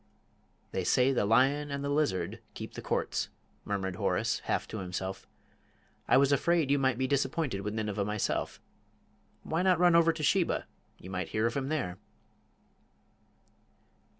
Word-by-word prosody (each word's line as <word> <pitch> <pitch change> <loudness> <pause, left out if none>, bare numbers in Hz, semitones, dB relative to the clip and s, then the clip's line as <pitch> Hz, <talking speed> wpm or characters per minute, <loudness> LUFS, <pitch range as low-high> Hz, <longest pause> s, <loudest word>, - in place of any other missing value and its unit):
"They 95 - -2
say 125 +8 +3
the 125 -6 +1
lion 135 +6 +3
and 140 0 -3
the 140 - -2
lizard 140 - 0
keep - - -7
the - - -7
Courts - - -1 0.2
" - - -38
murmured 95 -2 -2
Horace, - - 0
half - - -1
to 110 - -5
himself. 95 +1 -5 0.8
"I - - +5
was 140 +1 +4
afraid 160 0 +2
you 140 - +3
might 130 -3 +2
be 130 - 0
disappointed 135 -4 0
with 105 +2 -4
Nineveh 105 -2 -1
myself. 105 0 -2 0.8
Why 160 +2 -1
not 185 -1 +4
run 175 0 +5
over 165 0 +6
to 155 - -6
Sheba? 180 +3 +2 0.3
You 95 - -10
might 95 0 -2
hear 110 +1 0
of 115 - +1
him 135 -1 -2
there." 125 - -2
130 Hz, 160 wpm, -30 LUFS, 100-145 Hz, 0.8 s, over